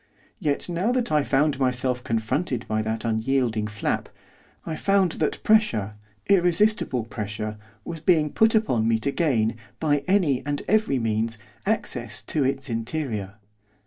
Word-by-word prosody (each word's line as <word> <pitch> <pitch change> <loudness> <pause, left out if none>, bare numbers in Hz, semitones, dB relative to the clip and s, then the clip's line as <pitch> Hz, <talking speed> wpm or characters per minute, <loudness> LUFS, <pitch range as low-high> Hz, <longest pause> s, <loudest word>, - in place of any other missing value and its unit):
Yet 150 -7 -1
now 180 +6 0
that 250 -2 0
I 150 -1 +4
found 145 0 +1
myself 125 -1 0
confronted 120 +3 -1
by 110 0 0
that 110 +1 -3
unyielding 115 -1 0
flap, 105 -1 -2 0.6
I 160 - -3
found 195 +1 +2
that 155 - +1
pressure, 120 - +3 0.3
irresistible 185 - +3
pressure, 105 -1 -5 0.3
was 165 -1 -5
being 155 -2 +3
put 220 0 +3
upon 125 - +2
me 115 -1 +3
to 125 +6 -1
gain, 115 -9 +1 0.2
by 145 -3 +1
any 165 -10 +2
and 145 +1 -3
every 215 -9 +2
means, 115 -1 0 0.3
access - - -2
to 150 - -1
its 135 +1 0
interior. 115 -4 -3
135 Hz, 145 wpm, -25 LUFS, 110-170 Hz, 0.6 s, I